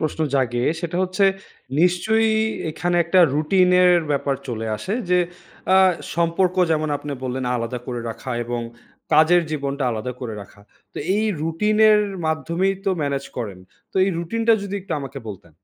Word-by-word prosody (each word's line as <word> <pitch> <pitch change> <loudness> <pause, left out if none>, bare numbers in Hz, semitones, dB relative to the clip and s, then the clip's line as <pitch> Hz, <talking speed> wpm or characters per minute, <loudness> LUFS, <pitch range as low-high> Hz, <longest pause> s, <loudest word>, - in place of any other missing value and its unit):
প্রশ্ন 155 0 -2
জাগে। 120 -2 +1 0.2
সেটা 170 -1 -3
হচ্ছে 185 +2 +1 0.6
নিশ্চয়ই 220 +6 +2 0.3
এইখানে 175 +3 -1
একটা 180 +2 +4
রুটিন 180 +5 +3
এর 180 - +6 0.2
ব্যাপার 140 -1 0
চলে 115 -2 -3
আসে। 190 - -5 0.2
যে 180 - +5 0.6
আ - - +7 0.4
সম্পর্ক 170 +2 +1 0.2
যেমন 155 -1 +1
আপনি 145 0 -6
বললেন 130 +1 -3
আলাদা 115 +1 -3
করে 120 -2 -4
রাখা 125 - -8
এবং 120 0 -3 0.5
কাজের 170 +2 +5
জীবনটা 140 -2 -2
আলাদা 115 +3 -4
করে 115 -4 -5
রাখা। 100 +1 -17 0.3
তো - - -7 0.2
এই 215 - +1 0.2
রুটিন 165 +7 0
এর 210 - +5 0.3
মাধ্যমেই 170 +5 0
তো 195 - +2
মেনেজ 140 -1 -2
করেন। 105 -6 -5 0.3
তো - - -8
এই 195 - +1
রুটিন 225 +7 -3
টা - - +8
যদি 200 0 -5
একটু 185 -2 -6
আমাকে 135 0 -7
বলতেন? 95 -5 -10
160 Hz, 165 wpm, -22 LUFS, 130-180 Hz, 0.6 s, টা